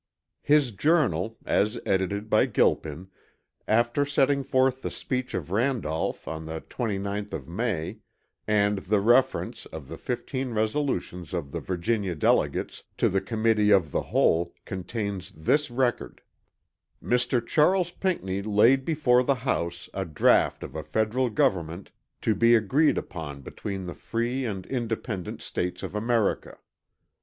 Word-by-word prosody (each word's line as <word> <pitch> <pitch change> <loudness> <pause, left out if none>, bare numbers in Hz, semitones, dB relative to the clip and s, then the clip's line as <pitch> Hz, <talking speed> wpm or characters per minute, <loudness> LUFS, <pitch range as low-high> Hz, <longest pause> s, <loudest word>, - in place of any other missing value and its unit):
His 145 -4 +3
journal 115 - +1
(as 105 +3 +1
edited 100 +2 0
by - - +3
Gilpin) 80 +5 0 0.6
after 120 +5 +2
setting 140 -1 +2
forth 130 0 +2
the - - -3
speech 130 -1 -3
of 85 -1 -4
Randolph 110 - -1
on 80 0 -5
the 80 0 -5
29th 100 -3 -3
of - - -5
May, 95 -2 -2 0.5
and 105 -1 +2
the 100 +2 +1
reference 120 +6 +2
of 80 -4 -9
the - - -8
15 125 0 -3
resolutions 110 - -1
of 75 -6 -4
the - - -3
Virginia 95 0 -1
delegates, 75 - +1
to - - +3
the 95 0 +1
Committee 110 0 +2
of 95 -7 +4
the - - 0
Whole, 85 +1 +1
contains 95 0 -4
this 145 - +1
record: 120 0 -1 0.8
"Mr. 125 -1 +1
Charles 175 +5 +3
Pinckney 100 - -2
laid 110 +6 +4
before 135 -5 +3
the 135 +2 +2
house 85 -8 -1
a 95 - -2
draught 80 -5 +2
of - - -8
a - - -3
federal 115 +4 0
government 90 -4 0 0.3
to 110 - +3
be 115 +3 +5
agreed 130 +8 +3
upon 75 -5 -6
between 95 +6 -6
the 90 - -5
free 120 +6 -2
and 95 -5 -4
independent 115 -6 -4
states 90 0 -3
of - - -5
America." 110 0 0
110 Hz, 140 wpm, -26 LUFS, 95-125 Hz, 0.8 s, be